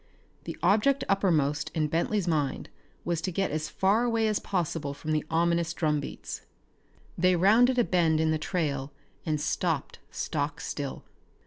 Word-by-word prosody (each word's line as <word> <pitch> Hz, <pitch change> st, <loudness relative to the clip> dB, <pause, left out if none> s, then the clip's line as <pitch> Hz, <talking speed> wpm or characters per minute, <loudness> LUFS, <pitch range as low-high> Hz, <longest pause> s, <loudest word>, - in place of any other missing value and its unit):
The -, -, -6 dB
object 270 Hz, +7 st, +3 dB
uppermost 150 Hz, -8 st, +1 dB
in 155 Hz, -1 st, +1 dB
Bentley's 175 Hz, +5 st, 0 dB
mind 150 Hz, -5 st, -1 dB, 0.4 s
was 170 Hz, -2 st, -1 dB
to 185 Hz, -, -2 dB
get 195 Hz, +3 st, -1 dB
as 155 Hz, 0 st, -2 dB
far 200 Hz, +8 st, +2 dB
away 230 Hz, -2 st, +1 dB
as 215 Hz, -1 st, +1 dB
possible 165 Hz, -6 st, -2 dB
from 155 Hz, +2 st, -5 dB
the 155 Hz, -1 st, +1 dB
ominous 170 Hz, 0 st, +1 dB
drumbeats. 150 Hz, -3 st, -2 dB, 0.8 s
They 180 Hz, +1 st, +4 dB
rounded 225 Hz, +8 st, +4 dB
a 245 Hz, -, +5 dB
bend 165 Hz, -6 st, +2 dB
in 160 Hz, 0 st, +2 dB
the 155 Hz, -, 0 dB
trail 145 Hz, -5 st, -2 dB, 0.4 s
and 155 Hz, -1 st, 0 dB
stopped 160 Hz, -1 st, -1 dB
stock 145 Hz, -2 st, -3 dB
still. 140 Hz, -2 st, -5 dB
165 Hz, 150 wpm, -28 LUFS, 150-195 Hz, 0.8 s, a